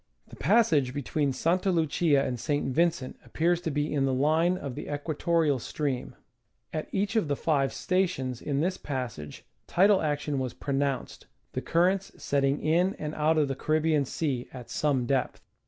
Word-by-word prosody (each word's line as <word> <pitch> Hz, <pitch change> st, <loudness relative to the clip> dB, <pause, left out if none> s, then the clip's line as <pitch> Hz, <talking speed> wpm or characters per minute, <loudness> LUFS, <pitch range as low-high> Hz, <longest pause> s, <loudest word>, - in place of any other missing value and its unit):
The -, -, -11 dB
passage 155 Hz, -, +3 dB
between 145 Hz, +1 st, 0 dB
Santa 180 Hz, +8 st, +1 dB
Lucia 155 Hz, -3 st, +2 dB
and 125 Hz, -2 st, -3 dB
St. 145 Hz, +1 st, -1 dB
Vincent 165 Hz, -4 st, 0 dB
appears 175 Hz, +2 st, 0 dB
to 165 Hz, -, -2 dB
be 150 Hz, 0 st, -1 dB
in 140 Hz, -2 st, +2 dB
the 135 Hz, -, +1 dB
line 160 Hz, +6 st, +2 dB
of 140 Hz, -7 st, -5 dB
the 150 Hz, +2 st, -6 dB
equatorial 150 Hz, 0 st, 0 dB
stream. 135 Hz, +1 st, -3 dB, 0.6 s
At 155 Hz, -, -3 dB
each 205 Hz, +3 st, -1 dB
of 220 Hz, -8 st, +2 dB
the 145 Hz, -, 0 dB
five 140 Hz, -3 st, +1 dB
sta 185 Hz, +1 st, +1 dB
tions 130 Hz, -8 st, -5 dB
in 145 Hz, -1 st, -1 dB
this 185 Hz, +3 st, 0 dB
passage 125 Hz, -, -5 dB, 0.2 s
tidal 195 Hz, +2 st, +4 dB
action 145 Hz, -2 st, -1 dB
was 130 Hz, -2 st, -3 dB
pronounced, 140 Hz, -2 st, -2 dB, 0.3 s
the -, -, -2 dB
currents 185 Hz, +3 st, +1 dB
setting 140 Hz, 0 st, 0 dB
in 175 Hz, +5 st, +2 dB
and 150 Hz, 0 st, -5 dB
out 155 Hz, +1 st, +2 dB
of 150 Hz, -2 st, +3 dB
the 135 Hz, -, -1 dB
Caribbean 155 Hz, 0 st, +1 dB
Sea 130 Hz, -3 st, -2 dB
at 125 Hz, -2 st, -10 dB
some 140 Hz, -5 st, +1 dB
depth. 130 Hz, 0 st, 0 dB
150 Hz, 170 wpm, -28 LUFS, 135-170 Hz, 0.6 s, tidal